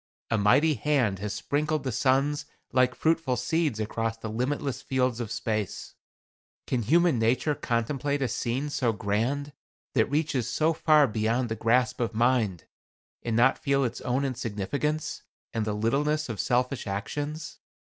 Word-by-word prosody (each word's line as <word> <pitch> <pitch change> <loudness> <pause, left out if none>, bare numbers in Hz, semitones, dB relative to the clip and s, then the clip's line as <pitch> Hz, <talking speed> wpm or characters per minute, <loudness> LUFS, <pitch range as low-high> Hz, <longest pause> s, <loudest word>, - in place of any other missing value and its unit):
A 115 - +3
mighty 140 +10 +4
hand 130 -10 +1
has 105 +1 -3
sprinkled 150 0 -1
the 130 - -2
suns 135 +5 +1 0.2
like 130 0 +3
fruitful 160 -5 +1
seeds 140 0 0
across 115 +1 -2
the 110 -1 -6
limitless 130 +3 -2
fields 125 -2 0
of 115 -3 -4
space. 110 -2 -3 0.7
Can 125 - 0
human 160 +3 +3
nature 125 +6 +2
contemplate 140 +3 -1
a - - +1
scene 130 +5 -2
so 120 -5 +1
grand 120 +9 -1 0.4
that 110 -4 +2
reaches 145 -5 0
so 155 +6 +2
far 155 -2 +5
beyond 115 +2 0
the 110 - -2
grasp 115 +2 +1
of 115 -1 -1
mind, 115 -7 +2 0.6
and 115 -2 -2
not 125 +3 +4
feel 140 0 +1
its 120 -1 -3
own 130 +3 0
insignificance, 130 +5 -2 0.3
and 110 -2 -1
the 105 - -1
littleness 145 +7 0
of 110 - -4
selfish 125 -1 0
actions? 145 +10 -4
125 Hz, 150 wpm, -27 LUFS, 115-145 Hz, 0.7 s, far